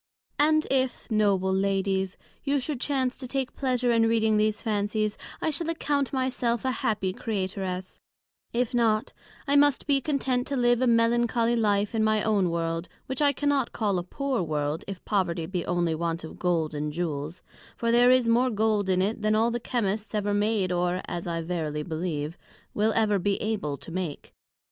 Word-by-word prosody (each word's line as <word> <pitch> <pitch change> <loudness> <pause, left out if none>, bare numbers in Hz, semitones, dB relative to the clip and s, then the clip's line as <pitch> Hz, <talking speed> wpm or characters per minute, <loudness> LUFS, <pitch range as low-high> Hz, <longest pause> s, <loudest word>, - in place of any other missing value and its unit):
And 310 +1 +4
if 260 -2 0
(Noble 200 -3 +2
Ladies)you 195 +8 -1
should 265 -1 -4
chance 260 -3 0
to 260 - -5
take 265 0 -2
pleasure 250 -2 +1
in 225 -1 +4
reading 220 -1 +2
these 215 0 +2
Fancies, 215 -1 0 0.3
I 315 - +2
shall 325 +3 0
account 290 -4 0
my 260 -1 0
self 240 -2 -1
a 260 - +2
Happy 210 -5 -1
Creatoress: 190 -3 -4 0.5
If 245 0 0
not, 225 -3 +1 0.3
I 280 - +3
must 285 -1 +4
be 275 -2 +2
content 265 -3 0
to 280 - -2
live 240 0 +3
a 255 - +3
Melancholly 235 0 +3
Life 205 -2 +1
in 220 -1 +1
my 215 -1 +2
own 205 -5 +2
World; 165 0 -2 0.2
which 265 +2 -3
I 290 -1 +5
cannot 280 -2 0
call 200 -5 0
a - - -4
Poor 265 +5 -2
World, 150 -1 -2
if 195 -2 -7
Poverty 180 -5 0
be 180 0 -3
only 175 -2 +1
want 165 +1 -2
of 160 - -9
Gold, 165 -4 0
and 150 0 -2
Jewels: 155 0 -4 0.3
for, 230 0 0
there 240 +1 +6
is 255 -2 +4
more 240 +3 +3
Gold 215 -3 +1
in 185 0 +3
it, 215 +3 -2
than 215 0 +2
all 225 +2 +3
the 240 - -2
Chymists 220 -3 -2
ever 205 -1 0
made; 205 -2 +1
or, 180 +1 0
(as 175 0 -5
I 165 -1 -2
verily 155 -3 -3
believe) 160 -1 -3 0.3
will 215 +2 +2
ever 210 -3 +2
be 200 +2 0
able 200 -10 -2
to - - -10
make. 175 -4 -5
215 Hz, 185 wpm, -27 LUFS, 180-245 Hz, 0.5 s, there